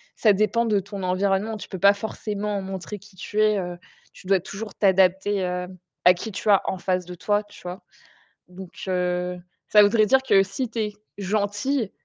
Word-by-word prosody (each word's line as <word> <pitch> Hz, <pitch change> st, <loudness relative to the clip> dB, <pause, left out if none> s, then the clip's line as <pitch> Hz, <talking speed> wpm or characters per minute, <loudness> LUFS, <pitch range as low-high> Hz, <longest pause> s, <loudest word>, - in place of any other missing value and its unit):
ça 215 Hz, -3 st, +4 dB
dépend 215 Hz, +4 st, +1 dB
de 210 Hz, -3 st, +2 dB
ton 200 Hz, 0 st, -7 dB
environnement. 195 Hz, +4 st, 0 dB
Tu -, -, -9 dB
peux 190 Hz, -, -6 dB
pas 200 Hz, +2 st, +6 dB
forcément 210 Hz, -1 st, -3 dB
montrer 190 Hz, +2 st, -6 dB
qui 200 Hz, 0 st, -18 dB
tu 210 Hz, +3 st, -2 dB
es, 215 Hz, -1 st, +4 dB
heu, 175 Hz, -1 st, -5 dB, 0.4 s
tu 185 Hz, -, -14 dB
dois 195 Hz, -1 st, +4 dB
toujours 205 Hz, +3 st, -7 dB
t'adapter, 190 Hz, 0 st, +3 dB
heu, 180 Hz, 0 st, -2 dB, 0.4 s
à 180 Hz, -, +9 dB
qui 215 Hz, +5 st, -6 dB
tu 205 Hz, +2 st, -3 dB
as 200 Hz, -, +6 dB
en 190 Hz, -, -2 dB
face 180 Hz, 0 st, -1 dB
de 180 Hz, 0 st, -8 dB
toi, 205 Hz, +4 st, 0 dB
tu 205 Hz, -, -16 dB
vois? 180 Hz, +1 st, -7 dB, 0.7 s
Donc 180 Hz, 0 st, -11 dB, 0.2 s
heu, 180 Hz, 0 st, -1 dB, 0.3 s
ça 210 Hz, -1 st, +7 dB
voudrait 215 Hz, +1 st, +4 dB
dire 265 Hz, +5 st, +4 dB
que 200 Hz, -6 st, +5 dB
si 225 Hz, +5 st, -4 dB
tu 230 Hz, -, -5 dB
es 210 Hz, -1 st, -1 dB, 0.2 s
gentille, 205 Hz, +4 st, -1 dB
200 Hz, 195 wpm, -24 LUFS, 185-210 Hz, 0.7 s, à